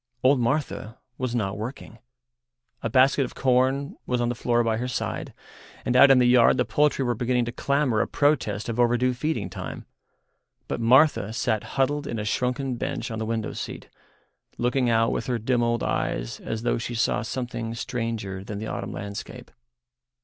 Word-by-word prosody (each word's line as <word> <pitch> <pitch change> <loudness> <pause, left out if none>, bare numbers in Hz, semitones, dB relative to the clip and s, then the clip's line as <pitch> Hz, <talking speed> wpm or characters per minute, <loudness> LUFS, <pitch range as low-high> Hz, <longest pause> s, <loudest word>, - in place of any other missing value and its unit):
Old 130 +1 +5
Martha 120 -3 -1 0.2
was 130 -2 -2
not 105 -3 -1
working. 115 0 -7 0.8
A 115 - -2
basket 135 +4 +4
of 125 - -6
corn 130 +2 +1
was 125 - 0
on 120 0 +1
the - - 0
floor 120 0 +1
by 115 -1 0
her 125 +2 -2
side, 125 - -3 0.5
and 125 - 0
out 140 +2 +8
in 135 - +7
the 125 - +4
yard 120 -1 +5
the - - +2
poultry 150 -2 +2
were 120 - +1
beginning 120 +1 0
to 120 - -4
clamour 140 -4 +1
a - - 0
protest 125 -8 +1
of 115 0 -3
overdue 120 +1 +3
feeding 125 - -2
time. 95 -1 -7 0.8
But - - -3
Martha 125 -2 +4
sat 110 -2 0
huddled 145 +2 +1
in 115 - -3
a 105 - -3
shrunken 125 +3 -1
bunch - - -3
on 110 - -4
the 110 - -3
window 110 -1 -2
seat, - - -7 0.7
looking 125 +1 +1
out 115 0 +3
with - - -3
her 125 -2 0
dim 120 +2 0
old 120 -1 0
eyes - - -2
as 110 0 -5
though 120 - +1
she 120 +1 -4
saw 115 - +1
something 120 -1 -4
stranger 115 -6 -4
than 100 +1 -6
the 110 - -5
autumn 100 -1 -4
landscape. 105 +5 -7
120 Hz, 185 wpm, -25 LUFS, 110-130 Hz, 0.8 s, out